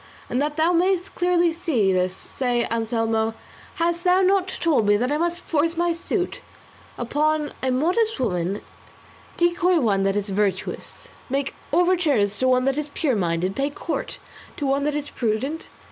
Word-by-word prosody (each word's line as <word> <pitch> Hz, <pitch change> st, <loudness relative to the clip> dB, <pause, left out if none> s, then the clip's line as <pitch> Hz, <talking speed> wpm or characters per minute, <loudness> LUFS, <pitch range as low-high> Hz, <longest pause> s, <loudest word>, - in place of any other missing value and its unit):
And 250 Hz, -, +1 dB
that 295 Hz, +1 st, -1 dB
thou 325 Hz, +3 st, +3 dB
mayest 365 Hz, +2 st, +1 dB
clearly 350 Hz, -1 st, +2 dB
see 285 Hz, -, +1 dB
this, 185 Hz, 0 st, +1 dB
say, 245 Hz, 0 st, -1 dB
Anselmo, 225 Hz, -1 st, 0 dB, 0.4 s
hast 340 Hz, +1 st, 0 dB
thou 365 Hz, +1 st, +4 dB
not 380 Hz, 0 st, +3 dB
told 320 Hz, -, +1 dB
me 205 Hz, 0 st, +5 dB
that 250 Hz, +5 st, -1 dB
I 295 Hz, -, +1 dB
must 345 Hz, +1 st, -1 dB
force 330 Hz, +1 st, 0 dB
my 345 Hz, 0 st, +2 dB
suit 360 Hz, +2 st, -2 dB, 0.6 s
upon 300 Hz, +4 st, 0 dB
a 260 Hz, -, 0 dB
modest 355 Hz, -, +1 dB
woman, 185 Hz, -4 st, -1 dB, 0.7 s
decoy 345 Hz, 0 st, +3 dB
one 205 Hz, -7 st, +2 dB
that 195 Hz, 0 st, +1 dB
is 205 Hz, 0 st, -1 dB
virtuous, 195 Hz, -1 st, -2 dB, 0.2 s
make 275 Hz, +1 st, -1 dB, 0.2 s
overtures 315 Hz, -, +2 dB
to 260 Hz, -, +2 dB
one 255 Hz, 0 st, +3 dB
that 270 Hz, +2 st, +1 dB
is 300 Hz, -1 st, -4 dB
pure 280 Hz, -7 st, +1 dB
minded, 180 Hz, 0 st, -1 dB
pay 275 Hz, +1 st, 0 dB
court 310 Hz, +3 st, -4 dB, 0.4 s
to 290 Hz, -, -2 dB
one 275 Hz, +1 st, +1 dB
that 295 Hz, 0 st, 0 dB
is 290 Hz, -1 st, -3 dB
prudent? 250 Hz, +8 st, -2 dB
285 Hz, 165 wpm, -23 LUFS, 225-340 Hz, 0.7 s, me